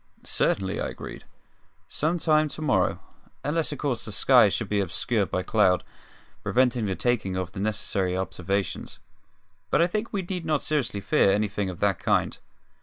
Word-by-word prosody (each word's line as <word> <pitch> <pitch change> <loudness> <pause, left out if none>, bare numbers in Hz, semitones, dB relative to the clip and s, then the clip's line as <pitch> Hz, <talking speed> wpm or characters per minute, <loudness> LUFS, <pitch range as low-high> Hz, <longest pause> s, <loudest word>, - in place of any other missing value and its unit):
"Certainly," 95 +1 0
I - - -1
agreed; - - -9 0.6
"some 160 +4 0
time 155 -2 +3
to 155 - -7
morrow 100 -11 +2 0.4
unless 155 +2 0
of 145 - -4
course 135 -6 -1
the 110 - -5
sky 120 0 +5
should 110 +2 -2
be 105 +1 0
obscured 100 +3 0
by 90 - -1
cloud, 95 -4 +3 0.6
preventing 125 -3 +2
the 95 - -1
taking 110 -6 0
of 90 -1 -3
the 95 - -7
necessary 100 -3 -1
observations. 95 +1 -3 0.7
But - - +2
I 170 - +6
think 215 +6 -3
we 200 -3 -2
need 180 -1 -4
not 155 -2 0
seriously 140 -9 -1
fear 95 0 +3
anything 105 -1 0
of 90 - -8
that 100 -3 +2
kind." - - +1
105 Hz, 170 wpm, -26 LUFS, 95-150 Hz, 0.7 s, I